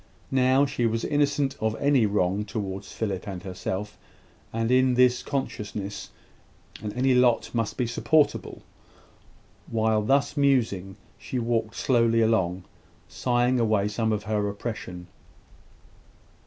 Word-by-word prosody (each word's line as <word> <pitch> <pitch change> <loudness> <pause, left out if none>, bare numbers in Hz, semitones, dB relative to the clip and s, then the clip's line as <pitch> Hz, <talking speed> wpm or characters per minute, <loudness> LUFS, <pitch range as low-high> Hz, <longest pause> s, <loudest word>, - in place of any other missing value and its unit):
Now, 130 +1 +4
she 120 -3 0
was 115 0 -1
innocent 145 -1 +1
of 110 0 0
any 140 -5 +3
wrong 100 0 0
towards 100 -2 -5
Philip 100 -4 -3
and 95 -3 -6
herself; 95 +2 -5 0.5
and, 115 +1 -1
in 130 0 +4
this 125 0 +4
consciousness, 105 -7 -4 0.7
any 125 +5 0
lot 125 -2 +3
must 115 -3 -2
be 125 - +1
supportable. 145 +5 +1 1.1
While 110 -1 +1
thus 135 +4 +1
musing, 115 -10 +1 0.2
she 130 - -5
walked 115 -2 -1
slowly 115 -3 +2
along, 95 -5 +1 0.4
sighing 125 0 +1
away 110 -3 +2
some 110 +2 -1
of 105 -1 -1
her 105 -1 -1
oppression. 100 -4 -6
115 Hz, 120 wpm, -26 LUFS, 105-125 Hz, 1.1 s, Now